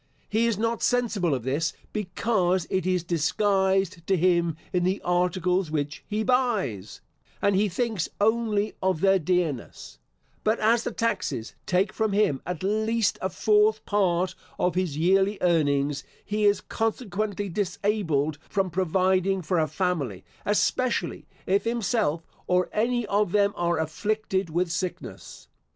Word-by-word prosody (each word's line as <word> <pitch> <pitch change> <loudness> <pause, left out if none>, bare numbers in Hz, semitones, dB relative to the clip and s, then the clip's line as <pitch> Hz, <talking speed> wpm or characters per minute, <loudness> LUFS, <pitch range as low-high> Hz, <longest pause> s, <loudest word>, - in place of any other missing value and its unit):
He 225 +2 +2
is 230 -4 0
not 230 +1 -1
sensible 220 - +1
of 125 - -5
this, 150 +6 -1 0.2
because 190 -3 0
it 190 -1 0
is 180 -2 +1
disguised 190 +1 +1
to 190 - +3
him 170 -2 +2 0.2
in 180 -1 +2
the 185 +2 +1
articles 180 0 +1
which 145 -1 -3
he 215 +1 -1
buys, 215 - 0 0.4
and 200 -1 +2
he 205 +2 +2
thinks 215 -1 -1
only 215 -1 +1
of 185 -4 0
their 195 -1 +4
dearness; 165 -6 -2 0.4
but 215 +2 +2
as 225 +2 +3
the - - -3
taxes 195 - -2
take 185 +2 +1
from 220 -2 0
him, 195 -10 +2
at 180 -1 -4
least, 220 +2 +1
a 190 - -1
fourth 210 +3 +2
part 185 -3 +1 0.2
of 180 - +1
his 180 -5 -1
yearly 195 +5 +3
earnings, 145 -5 +1 0.2
he 210 0 0
is 205 0 +3
consequently 215 -3 -2
disabled 180 -6 -1
from 195 -3 0
providing 185 +2 +1
for 170 +2 +1
a 155 - +2
family, 150 - -2 0.2
especially, 210 -1 0 0.2
if 195 +2 +2
himself, 220 -8 0 0.2
or 180 0 +2
any 240 +2 +1
of 205 -2 0
them, 200 -1 +3
are 170 -1 0
afflicted 190 +4 -1
with 175 +2 0
sickness. 180 +1 -5
190 Hz, 140 wpm, -26 LUFS, 170-210 Hz, 0.4 s, their